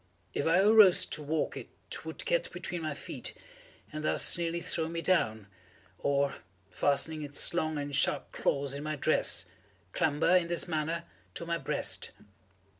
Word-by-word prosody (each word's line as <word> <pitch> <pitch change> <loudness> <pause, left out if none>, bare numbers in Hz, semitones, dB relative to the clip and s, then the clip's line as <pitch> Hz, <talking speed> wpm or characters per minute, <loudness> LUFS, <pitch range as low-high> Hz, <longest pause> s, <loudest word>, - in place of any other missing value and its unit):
If 140 - -1
I 165 +2 +5
arose 210 -3 +7
to 155 - -5
walk 155 +1 -1
it - - -7 0.3
would - - -6
get - - +1
between 175 -1 -4
my 155 -2 -3
feet - - -6 0.6
and 155 0 -4
thus - - +4
nearly 170 0 -1
throw 165 -2 -2
me 165 0 -3
down, 110 - +1 0.5
or, 140 0 +1 0.3
fastening 155 +2 0
its 145 +3 0
long 155 -3 0
and 145 -1 -3
sharp 140 - +1
claws 140 -1 0
in 140 - -5
my 155 0 -2
dress, 145 - +1 0.5
clamber, 155 +4 +3
in 175 -2 0
this 170 +1 -2
manner, 165 +1 -1 0.3
to 170 - -4
my 170 0 -1
breast. - - -2
160 Hz, 160 wpm, -31 LUFS, 145-170 Hz, 0.6 s, arose